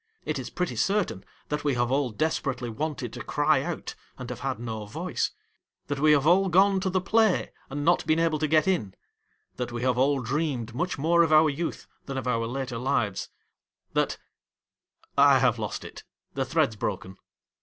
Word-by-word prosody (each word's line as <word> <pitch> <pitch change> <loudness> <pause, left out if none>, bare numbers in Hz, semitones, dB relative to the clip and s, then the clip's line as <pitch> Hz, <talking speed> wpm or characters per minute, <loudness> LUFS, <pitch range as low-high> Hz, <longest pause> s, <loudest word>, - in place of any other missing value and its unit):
It - - -2
is - - -6
pretty 180 -1 -3
certain 195 - 0 0.3
that 150 - -2
we 145 -3 +1
have 120 0 0
all 135 -1 +1
desperately 130 -2 -2
wanted 150 +3 -4
to - - -6
cry - - +2
out, - - -4 0.2
and 125 -1 -6
have 125 - -6
had 135 -1 -2
no 110 -3 -5
voice; 105 - -2 0.6
that 145 -1 -2
we 155 +1 +5
have 145 -1 +3
all 190 +4 +4
gone 190 +2 +4
to 190 - -1
the 185 0 +1
play 215 +1 +2 0.2
and 145 +2 -3
not 175 0 +3
been 155 0 +3
able 165 -2 +1
to 155 - +1
get 155 +3 +3
in; 110 - 0 0.6
that 125 -1 -3
we 120 0 -4
have 125 -1 +1
all 140 +1 +3
dreamed 130 -2 -2
much 180 +9 -2
more 170 +4 +3
of 165 -2 +2
our 155 0 +6
youth 165 +4 -4 0.2
than, 135 -1 -4
of 130 - -3
our 115 -2 0
later 125 -1 -4
lives; 125 -6 -1 0.6
that - - +1 1.0
1 140 -1 +6
have 120 -3 +3
lost 105 -2 -4
it! - - -10 0.3
The - - -1
thread's 110 - +1
broken. 95 -2 -4
140 Hz, 190 wpm, -27 LUFS, 120-160 Hz, 1.0 s, our